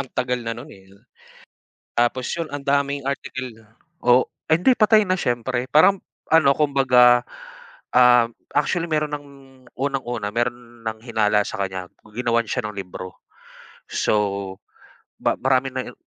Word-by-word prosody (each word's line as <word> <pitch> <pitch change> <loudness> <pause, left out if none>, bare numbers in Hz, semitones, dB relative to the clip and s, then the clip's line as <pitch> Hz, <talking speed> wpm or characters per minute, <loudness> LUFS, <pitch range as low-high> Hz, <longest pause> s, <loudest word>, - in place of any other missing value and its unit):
ang 130 - -5
tagal 125 0 -1
na 115 -1 -4
nun, 120 - -10
eh. 95 -1 -17 1.1
Tapos 120 +2 +1
yun 165 - -2
ang 145 - -5
daming 140 0 0
article 130 -2 -4 0.5
Oh, 125 -1 +3 0.2
ah, 160 - +4
hindi 180 +11 +4
patay 215 0 +5
na 185 -2 0
siyempre 120 -2 -1
parang 155 +9 +5 0.3
ano, 155 -4 +5
kumbaga, 125 -4 +4 0.7
um, 125 -2 +6 0.3
actually 165 +4 +1
meron 150 -1 0
ng 145 0 -14 0.5
unang-una 125 -6 -3
meron 120 -1 -4
ng 110 0 -3
hinala 105 -3 +1
sa 110 - -6
kanya 95 -1 -4 0.3
ginawan 115 -1 0
siya 125 +4 -2
ng 105 - -10
libro, 95 -1 -8 0.7
so, 100 -2 -1 0.7
ba - - +1
marami 130 +1 +2
nang 130 -1 -5
125 Hz, 140 wpm, -22 LUFS, 115-140 Hz, 1.1 s, um